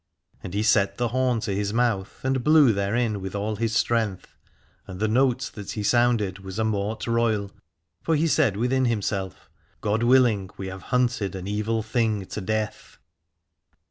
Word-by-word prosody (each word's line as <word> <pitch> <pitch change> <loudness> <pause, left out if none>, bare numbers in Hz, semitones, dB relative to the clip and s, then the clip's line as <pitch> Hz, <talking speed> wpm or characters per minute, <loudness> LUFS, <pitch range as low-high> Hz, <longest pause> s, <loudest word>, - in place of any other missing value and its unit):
And 90 - -7
he 105 - +1
set 100 -2 +2
the 120 -1 0
horn 125 -1 +1
to 105 - -2
his 100 +1 -2
mouth, 115 -5 -1
and 130 -1 0
blew 150 -5 +6
therein 105 +1 -1
with 95 +1 -6
all 105 +1 -2
his 115 0 -1
strength, 110 -5 -1 0.5
and 95 -2 -8
the 110 - +1
note 125 +2 +1
that 105 -3 -8
he 105 - -4
sounded 115 -4 +2
was 95 0 -8
a 110 - +1
mort 110 0 -2
royal: 115 -4 0 0.5
for 165 - +1
he 155 +2 +2
said 145 -10 +2
within 130 +3 +1
himself: 100 -5 -2 0.3
God 105 +1 0
willing, 120 -6 +3
we 95 0 -5
have 95 0 -8
hunted 125 -6 0
an 95 -1 -6
evil 105 +2 -1
thing 110 -3 0
to 105 - -6
death. 110 +2 -3
110 Hz, 175 wpm, -25 LUFS, 100-120 Hz, 0.5 s, blew